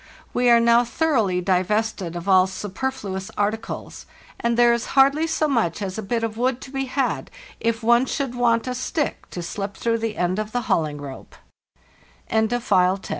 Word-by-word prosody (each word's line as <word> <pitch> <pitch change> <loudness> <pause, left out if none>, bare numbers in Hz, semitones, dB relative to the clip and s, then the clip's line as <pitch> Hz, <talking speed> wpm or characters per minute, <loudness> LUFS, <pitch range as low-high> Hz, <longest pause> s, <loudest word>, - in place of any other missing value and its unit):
We 245 0 +3
are 235 0 +7
now 235 +1 +5
thoroughly 230 - +1
divested 190 0 0
of 175 +2 -6
all 185 -1 +5
super 205 +6 -3
fluous 195 -6 -6
articles, 215 +2 -3 0.3
and 235 0 0
there 240 0 +6
is 235 0 -2
hardly 280 +4 +5
so 315 -1 +1
much 230 - 0
as 195 0 -4
a - - -2
bit 230 +3 -2
of 225 -1 -3
wood 250 0 +1
to 260 - -10
be 270 -1 -2
had 260 0 -1 0.3
if 230 0 -1
one 235 +3 +4
should 275 -4 -2
want 235 -2 +2
a 255 - -2
stick 270 +4 -3
to 175 - -6
slip 195 +3 -5
through 230 -1 0
the 225 -1 -3
end 180 +3 0
of 215 0 -4
the 245 -2 -2
230 Hz, 170 wpm, -23 LUFS, 200-250 Hz, 0.3 s, are